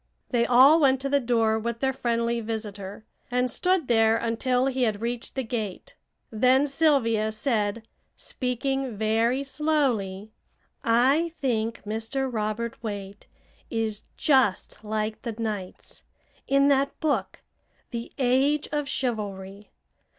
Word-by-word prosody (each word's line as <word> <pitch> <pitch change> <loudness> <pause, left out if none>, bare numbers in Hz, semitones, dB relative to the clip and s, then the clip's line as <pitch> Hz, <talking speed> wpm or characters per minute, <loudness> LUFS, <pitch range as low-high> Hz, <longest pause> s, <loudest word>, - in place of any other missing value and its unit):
They 235 -2 +2
all 265 +6 +7
went 265 -3 +4
to 275 - -2
the 285 0 +3
door 225 -3 +1
with 235 +1 -3
their 265 +1 +1
friendly 235 -2 0
visitor, 210 -2 -6 0.2
and 250 0 0
stood 365 -2 +1
there 225 -1 +4
until 250 +3 0
he 265 -1 -1
had 215 -4 +1
reached 235 +1 -4
the 265 - -1
gate. 225 - -5 0.4
Then 255 +5 +4
Sylvia 270 -7 +2
said, 220 -1 -1 0.3
speaking 255 -1 -3
very 225 +5 +1
slowly: 255 -10 -1 0.5
"I 270 +9 +3
think 230 -4 -1
Mr. 225 +6 -2
Robert 220 +1 -3
Waite 205 -2 -6 0.4
is 220 -2 -2 0.2
just 260 - +1
like 215 0 -3
the 235 - -4
Knights 210 -4 -6 0.5
in 275 +1 +4
that 275 0 +1
book, 310 -2 -1 0.5
'The 235 -1 -5
Age 270 +3 +2
of 295 -2 -2
Chivalry.' 205 -6 -4
235 Hz, 125 wpm, -26 LUFS, 220-270 Hz, 0.5 s, all